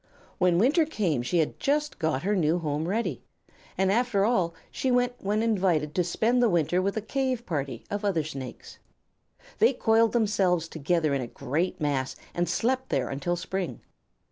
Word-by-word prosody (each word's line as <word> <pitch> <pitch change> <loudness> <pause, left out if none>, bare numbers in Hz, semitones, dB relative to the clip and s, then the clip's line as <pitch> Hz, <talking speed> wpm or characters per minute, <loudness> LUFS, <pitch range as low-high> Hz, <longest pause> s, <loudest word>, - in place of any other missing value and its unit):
When 180 -2 +3
winter 275 - +4
came 195 - -1
she 125 +8 -1
had 160 -2 0
just 295 +1 0
got 160 -4 0
her 205 +2 +1
new 165 -2 +2
home 155 -1 -2
ready, 190 - -1 0.6
and 190 +1 +2
after 220 -3 +2
all 185 -8 +1 0.2
she 260 - -1
went 245 0 +2
when 210 +3 0
invited 180 -9 +1
to 180 - +2
spend 225 +8 +1
the 240 - +4
winter 175 0 +2
with 200 +3 -1
a 215 - -2
cave 255 0 -1
party 140 - -3
of 205 +1 -2
other 185 -6 +1
Snakes. 135 -4 -8 0.8
They 435 - +5
coiled 225 -2 +3
themselves 195 -7 +2
together 160 -1 0
in 135 - 0
a 120 - -4
great 145 +10 -2
mass 140 -3 -1 0.2
and 175 -1 -1
slept 260 +8 0
there - - 0
until 140 +6 -1
spring. 180 0 -4
185 Hz, 175 wpm, -27 LUFS, 160-225 Hz, 0.8 s, They